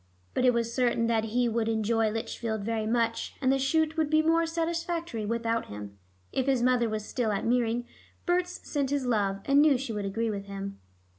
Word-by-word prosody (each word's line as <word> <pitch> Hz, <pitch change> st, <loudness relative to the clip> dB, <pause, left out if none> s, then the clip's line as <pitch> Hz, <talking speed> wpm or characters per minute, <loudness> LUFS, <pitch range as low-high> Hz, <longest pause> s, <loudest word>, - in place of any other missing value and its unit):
But 255 Hz, -, +1 dB
it 250 Hz, -, +7 dB
was 230 Hz, 0 st, -1 dB
certain 240 Hz, -2 st, +2 dB
that 225 Hz, -1 st, +1 dB
he 240 Hz, +2 st, +1 dB
would 225 Hz, -1 st, 0 dB
enjoy 225 Hz, 0 st, +1 dB
Lichfield 220 Hz, 0 st, -3 dB
very 220 Hz, 0 st, -1 dB
much, 230 Hz, 0 st, 0 dB
and 260 Hz, -2 st, +2 dB
the 270 Hz, -, +2 dB
shoot 315 Hz, +4 st, +1 dB
would 310 Hz, -2 st, +1 dB
be 310 Hz, +1 st, +4 dB
more 330 Hz, +1 st, +3 dB
satisfactory 335 Hz, -7 st, -2 dB
without 230 Hz, 0 st, -1 dB
him. 105 Hz, -1 st, -9 dB, 0.3 s
If 265 Hz, 0 st, -1 dB
his 260 Hz, -3 st, +2 dB
mother 250 Hz, -2 st, +3 dB
was 215 Hz, -1 st, -3 dB
still 235 Hz, -2 st, -1 dB
at 200 Hz, -, -1 dB
Meering, 240 Hz, 0 st, +1 dB, 0.4 s
Berts 360 Hz, 0 st, -1 dB
sent 280 Hz, -3 st, -1 dB
his 285 Hz, -2 st, 0 dB
love, 200 Hz, -5 st, 0 dB
and 280 Hz, +1 st, +5 dB
knew 295 Hz, -3 st, +5 dB
she 245 Hz, -3 st, -4 dB
would 205 Hz, -1 st, -3 dB
agree 225 Hz, +3 st, -1 dB
with 200 Hz, -1 st, -5 dB
him. 200 Hz, 0 st, -6 dB
235 Hz, 205 wpm, -28 LUFS, 220-275 Hz, 0.4 s, it